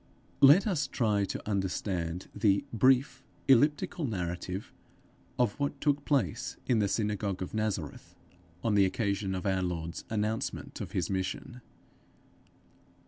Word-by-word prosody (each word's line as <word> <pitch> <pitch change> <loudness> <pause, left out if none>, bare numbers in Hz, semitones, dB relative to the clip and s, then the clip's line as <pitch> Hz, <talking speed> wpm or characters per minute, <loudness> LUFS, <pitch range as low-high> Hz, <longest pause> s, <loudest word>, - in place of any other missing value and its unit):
Let 145 - +8
us 165 -9 0
try 105 -7 +1
to - - -6
understand 95 -3 -2
the 100 -3 +2
brief, 130 +3 +3 0.2
elliptical 145 +5 +3
narrative 90 -4 -4 0.6
of 125 0 +1
what 140 0 -1
took 145 0 +1
place 130 - 0
in 120 -3 +2
the 100 - +2
synagogue 100 -2 -1
of - - -8
Nazareth 110 -8 -3 0.5
on 110 - +1
the 100 -1 +5
occasion 100 -1 -1
of 90 - -4
our 95 -1 +1
Lord's 85 -2 -3
announcement 110 +2 -2
of - - -6
his - - -1
mission. 95 +6 -3
105 Hz, 130 wpm, -30 LUFS, 95-130 Hz, 0.6 s, Let